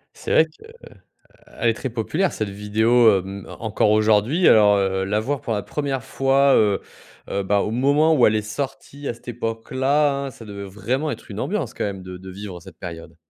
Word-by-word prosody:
C'est - - -6
vrai 160 - +6 0.9
qu'elle 120 - -4
est 115 - +3
très 130 - -5
populaire 155 - -1
cette 110 -2 -3
vidéo, 110 +4 +3
hem, 95 +1 -8
encore 110 -1 +1
aujourd'hui, 110 - +3
alors, 105 -2 +6
heu, 95 -1 0
la 105 +2 0
voir 140 +4 -2
pour 115 - -3
la 105 - -2
première 140 -4 -3
fois, 135 +1 +3
heu, 105 -2 +3 0.5
heu, 100 - -1
bah 100 +1 +2
au 105 - -1
moment 145 +6 +3
où 125 - +5
elle 110 - +3
est 105 - +1
sortie 135 +5 -6
à - - -2
cette 120 - -18
époque-là, 130 +5 0
hein, - - -5
ça 115 - -12
devait 100 -1 -7
vraiment 120 +10 -2
être - - -10
une 100 - -7
ambiance 175 - -2
quand - - -3
même 95 -2 -4
de 90 0 -8
de 95 +1 -10
vivre 95 -1 -8
cette 90 -2 -14
période. 85 -2 -9
110 Hz, 205 wpm, -22 LUFS, 100-135 Hz, 0.9 s, vrai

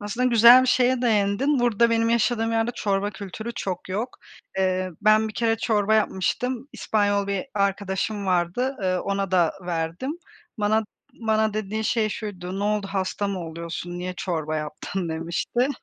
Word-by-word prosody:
Aslında 230 +5 -1
güzel 240 +1 +8
bir - - 0
şeye 255 0 +3
değindin. 225 +5 +2
Burada 235 -1 +3
benim 230 0 +2
yaşadığım 230 0 +1
yerde 225 +1 +1
çorba 200 0 0
kültürü 210 +4 -7
çok 185 -2 -4
yok. 215 +7 -3 0.4
Eee, 185 -1 +1
ben 215 +1 +4
bir 215 - -9
kere 225 -1 +1
çorba 215 -2 +2
yapmıştım, 245 +6 0
İspanyol 205 -2 0
bir 200 +6 -2
arkadaşım 200 +1 -1
vardı, 185 +9 0
eee, 185 -1 +1
ona 195 -1 -2
da 175 -3 +3
verdim. 170 - -2 0.5
Bana 215 +1 +2 0.4
bana 220 -1 +2
dediğin 215 +1 -2
şey 220 -1 +1
şuydu: 190 -3 -5
"Ne 200 - -1
oldu, 210 -1 0
hasta 195 +1 -1
mı 195 - -3
oluyorsun, 170 +2 -6
niye 180 +1 -4
çorba 155 -4 -2
yaptın?" 155 +4 -4
demişti. 170 +10 -1
205 Hz, 155 wpm, -24 LUFS, 185-225 Hz, 0.5 s, güzel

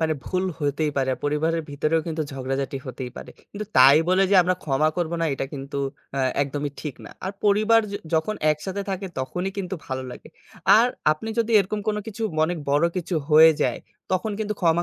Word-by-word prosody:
মানে 160 -1 +1
ভুল 185 0 -1
হইতেই 150 0 0
পারে। 135 -1 +1
পরিবারের 160 +3 0
ভিতরেও 155 +3 +1
কিন্তু 160 -1 -2
ঝগড়াঝাটি 135 +1 -3
হতেই 125 0 -6
পারে। - - -8 0.2
কিন্তু 210 +1 -5
তাই 135 +3 +8
বলে 185 +1 +4
যে 200 - +4
আমরা 185 +1 +1
ক্ষমা 150 +1 +2
করব 170 -2 -1
না, - - +2
এটা - - -3
কিন্তু 140 0 -6 0.4
অ্যা 135 - -1 0.2
একদমই 145 +1 -3
ঠিক 150 -4 -5
না। - - -10
আর 190 - -3
পরিবার 215 +2 +4
য - - -4 0.2
যখন 160 +7 +1 0.2
একসাথে 190 +6 -3
থাকে 195 0 -3
তখনই 180 +9 -3
কিন্তু 190 -1 -3
ভালো 130 -1 -3
লাগে। - - -11 0.5
আর 235 - +5 0.3
আপনি 220 +9 -7
যদি 230 0 +1
এরকম 205 +2 -3
কোনো 210 0 0
কিছু 220 +1 -6 0.2
অনেক 175 +1 -2
বড় 145 +4 +3
কিছু 180 0 -2 0.2
হয়ে 160 +1 +9
যায়, 125 - 0 0.3
তখন 185 +3 0
কিন্তু 210 -1 -2
ক্ষমা 170 -1 +3
160 Hz, 195 wpm, -24 LUFS, 140-195 Hz, 0.5 s, হয়ে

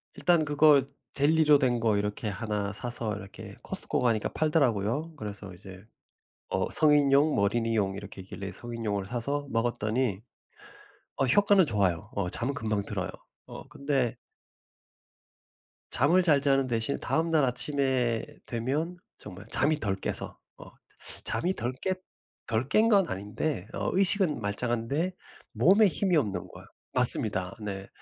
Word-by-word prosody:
일단 170 -3 +2
그거 150 -1 +5 0.3
젤리로 150 +1 +4
된 125 -3 +1
거 110 -2 +1
이렇게 105 +2 -3
1 105 -1 -3
사서 115 -1 -4
이렇게 100 +1 -10
코스트코 - - 0
가니까 115 -4 +1
팔더라고요. 145 -1 0
그래서 105 -5 -7
이제 95 +2 -13 0.6
어 95 0 -1
성인용, 145 -1 +4
어린이용 105 -1 0
이렇게 100 -1 -9
있길래 100 +1 -7
성인용을 110 -2 -4
사서 140 +6 -3
먹었더니 115 -2 -1 1.0
어 135 - +1
효과는 200 +3 +4
좋아요. 100 - 0
어 100 -3 -1
잠은 125 +8 -2
금방 110 -5 -2
들어요. - - -4 0.4
어 - - -10
근데 135 -4 -1 1.8
잠을 165 +7 +3
잘 150 -5 +4
자는 135 -1 +2
대신 115 +2 -2
다음날 160 -2 +1
아침에 125 -2 0 0.2
되면 140 +9 -2 0.2
정말 100 +1 -11
잠이 145 +6 +1
덜 100 -6 -1
깨서 95 - -5 0.2
어 - - -12 0.6
잠이 185 +3 -1
덜 120 +2 -2
깼 190 - 0 0.5
덜 115 +4 -2
깬 220 +1 +4
건 200 -5 +4
아닌데 105 - -3
어 - - -2
의식은 190 -3 +3
말짱한데 120 - -2 0.4
몸에 205 +3 +5
힘이 185 0 0
없는 100 -10 -2
거야. - - -13 0.3
맞습니다. 95 -3 +5
네. 100 -2 -5
120 Hz, 280 characters per minute, -28 LUFS, 105-150 Hz, 1.8 s, 그거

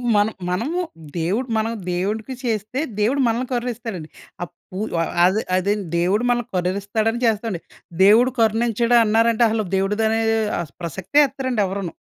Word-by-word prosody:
మనం 205 +1 +2 0.2
మనము 255 - -1 0.4
దేవుడు 195 +10 -1
మనం 220 +1 0 0.2
దేవుడికి 210 +8 -2
చేస్తే 225 +1 -2 0.2
దేవుడు 260 +7 +2
మనల్ని 235 +2 -1
కరుణిస్తాడండి. 235 -8 -4 0.4
ఆహ్, 175 - -6 0.2
పూ 185 - -7 0.5
అదే 190 +4 +2
అదేండి 200 +1 0
దేవుడు 195 +7 +1
మనల్ని 240 -1 0
కరుణిస్తాడని 200 +5 -1
చేస్తామండి. 220 -5 0 0.4
దేవుడు 230 +6 +6
కరుణించడు 230 +1 +2
అన్నారంటే 225 +2 +3
అసలు 220 -1 -1
దేవుడిదనే 220 +3 +1 0.4
ఆస్ 150 -5 -9
ప్రసక్తే 190 - 0
ఎత్తరండి 260 -5 -1
ఎవరును. 190 -2 -4
220 Hz, 130 wpm, -21 LUFS, 195-235 Hz, 0.5 s, దేవుడు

